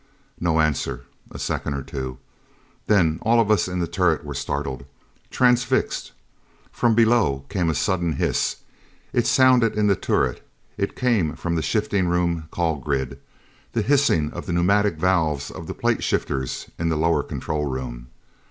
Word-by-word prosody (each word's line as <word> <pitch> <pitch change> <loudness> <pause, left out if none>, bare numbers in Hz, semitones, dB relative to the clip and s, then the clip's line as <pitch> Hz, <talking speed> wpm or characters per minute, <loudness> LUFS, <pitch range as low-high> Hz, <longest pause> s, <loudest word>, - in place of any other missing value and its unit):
No 85 -2 +1
answer. 70 -5 -1 0.2
A - - -9
second 70 - -2
or 70 - -4
two. 65 -1 -5 0.7
Then 85 -7 +3
all 115 +1 +3
of 110 -2 +3
us 105 - +3
in 90 0 -3
the 85 - 0
turret 85 -3 +1
were 75 - -5
startled. 70 -1 -3 0.5
Transfixed. 125 +1 +1 0.6
From 115 -2 +2
below 110 - +3
came 95 -4 0
a 80 - 0
sudden 85 +3 0
hiss. - - 0 0.6
It - - +2
sounded 125 -4 +4
in 105 - +2
the 100 -1 +4
turret; - - 0 0.3
it 100 0 -2
came 110 - +1
from 85 - -3
the 80 - 0
shifting 100 +4 0
room 85 -2 0
call 80 -2 -1
grid. 70 -3 -3 0.5
The 115 - +1
hissing 125 - +2
of - - -7
the 90 - -2
pneumatic 100 +3 +2
valves 80 -4 0
of - - -9
the - - -5
plate - - 0
shifters 65 -3 -2
in 85 0 0
the 80 - 0
lower 85 +2 +2
control 75 -1 -3
room. 60 -2 -5
85 Hz, 160 wpm, -23 LUFS, 75-105 Hz, 0.7 s, sounded